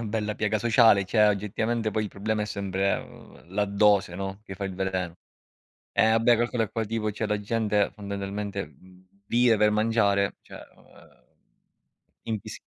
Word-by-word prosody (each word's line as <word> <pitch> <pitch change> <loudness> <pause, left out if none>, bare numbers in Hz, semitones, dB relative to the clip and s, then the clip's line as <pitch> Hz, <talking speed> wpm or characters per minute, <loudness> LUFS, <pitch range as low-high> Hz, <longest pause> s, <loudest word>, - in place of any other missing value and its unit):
una - - -4
bella 105 -1 -2
piaga 110 0 0
sociale, 110 -2 +5
cioè, 105 +2 +4
oggettivamente 110 +2 -1
poi 110 - 0
il 105 - -3
problema 105 +2 -2
è - - -3
sempre, 100 -1 -2
ehm, - - -11
la 105 0 +2
dose, 100 -2 +2
no, 95 +1 -5
che 95 -3 -8
fa 100 - -4
il 95 -1 -4
veleno. 95 -2 -2 0.8
Eh 110 +1 +4
beh, 115 +1 +4
calcola 120 0 0
poi 115 +1 -3
tipo 110 0 -2
cioè 110 +2 -3
la 105 - 0
gente, 105 -1 0
fondamentalmente, 100 0 -5
mhmmm 90 +6 -20 0.2
vive 120 -1 +4
per 105 0 +4
mangiare, 105 -2 +2
cioè, - - -15 0.2
o - - -21
ehm - - -21 1.0
invisi 110 -3 -5
105 Hz, 170 wpm, -26 LUFS, 100-110 Hz, 1.0 s, sociale